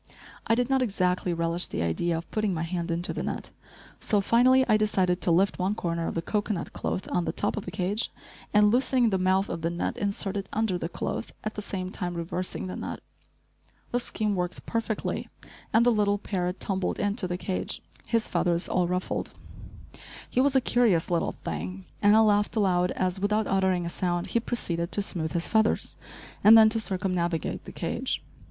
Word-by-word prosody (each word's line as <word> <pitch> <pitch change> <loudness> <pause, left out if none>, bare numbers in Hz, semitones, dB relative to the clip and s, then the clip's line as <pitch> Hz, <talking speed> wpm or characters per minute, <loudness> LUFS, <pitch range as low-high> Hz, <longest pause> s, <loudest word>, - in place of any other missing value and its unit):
I 225 - +4
did 245 0 +1
not 265 0 +2
exactly 185 -5 0
relish 170 +1 0
the 80 - -2
idea 160 - 0
of 165 - -8
putting 215 -4 0
my 160 - -2
hand 170 0 -3
into 170 +1 -2
the - - -3
net, - - -4 0.5
so 210 - +2
finally 255 +5 +4
I - - +5
decided 190 -4 +1
to - - +1
lift 185 +4 +3
one 190 +3 0
corner 170 -3 -2
of - - -4
the 165 - -1
cocoanut 205 -3 -2
cloth 185 - -3
on 175 - +1
the - - 0
top 205 - -1
of 210 - -5
the - - -4
cage, 200 +3 -1 0.4
and, 210 0 +5
loosening 245 -1 +3
the 190 - +1
mouth 190 +1 +2
of 165 - -4
the 165 - 0
net, 170 0 -2
insert 200 -1 -1
it 195 - -5
under 210 -5 0
the 165 - -3
cloth, - - -4
at 215 - -3
the 210 - -5
same 185 -2 -4
time 175 -3 -4
reversing 175 +3 -3
the 185 - -5
net. - - -5 0.9
The 245 - +1
scheme 215 -3 -1
worked 180 -1 -3
perfectly 230 -2 -2 0.4
and 225 +2 +4
the 245 - +5
little 205 -2 +2
parrot 180 -3 -3
tumbled 190 -2 -1
into 205 -1 0
the 180 0 -2
cage, 185 0 -3 0.2
his 230 -2 +1
feathers 170 0 +1
all 180 -1 +1
ruffled. 180 +1 -2 0.9
He 255 - +1
was 275 0 +2
a 265 - +5
curious 220 -11 +2
little 170 - +1
thing 90 +4 -5 0.2
and 205 +1 +6
I 220 - +7
laughed 205 0 +3
aloud 180 -4 +2
as, 185 0 -1
without 210 +2 +1
uttering 190 -3 +1
a - - -2
sound, 175 -1 -1
he 235 - +4
proceeded 170 -8 -2
to 205 - +2
smooth 165 -5 -3
his 170 -1 -1
feathers, 220 0 +2 0.5
and 220 +2 +10
then 220 -1 +8
to 225 +1 0
circumnavigate 180 -5 -1
the - - -8
cage. - - -2
190 Hz, 200 wpm, -27 LUFS, 175-215 Hz, 0.9 s, and